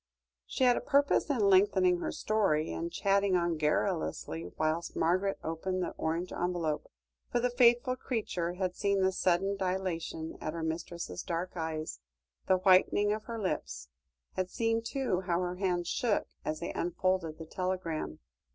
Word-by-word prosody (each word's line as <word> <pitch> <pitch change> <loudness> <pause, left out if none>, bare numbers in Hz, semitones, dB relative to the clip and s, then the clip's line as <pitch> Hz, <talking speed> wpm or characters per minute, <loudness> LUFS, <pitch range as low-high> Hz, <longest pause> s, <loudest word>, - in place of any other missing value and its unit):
She - - -1
had 245 -1 +5
a - - -1
purpose 285 +2 +3
in 265 -6 +1
lengthening 185 -2 +4
her - - -2
story, 195 -8 +1
and 170 +1 -3
chatting 195 0 +2
on 170 -1 +1
garrulously 85 - -1
whilst 155 +2 -1
Margaret 185 +4 +1
opened 185 +3 -2
the - - -2
orange 165 +3 -2
envelope, 170 -4 -1 0.4
for 240 - +2
the 245 +1 +1
faithful 245 +1 +4
creature 195 -9 -2
had 180 -1 -2
seen 200 -1 +1
the 190 - +3
sudden 190 +2 +1
dilation 180 -4 -3
of 155 - -3
her 165 -1 -4
mistress's 160 - -4
dark 175 +2 -3
eyes, 155 - -3 0.5
the 190 -1 +5
whitening 190 +2 +4
of 215 0 -5
her 230 -1 -5
lips; 65 - -3 0.4
had 185 -1 -2
seen, 225 +1 0
too, 230 -6 -1
how 170 -1 +2
her 180 0 -2
hands 180 -3 0
shook 225 +1 +1 0.2
as 155 +1 -3
they 170 - -3
unfolded 175 -2 0
the 160 - -8
telegram. 175 - -3
180 Hz, 160 wpm, -31 LUFS, 165-200 Hz, 0.5 s, had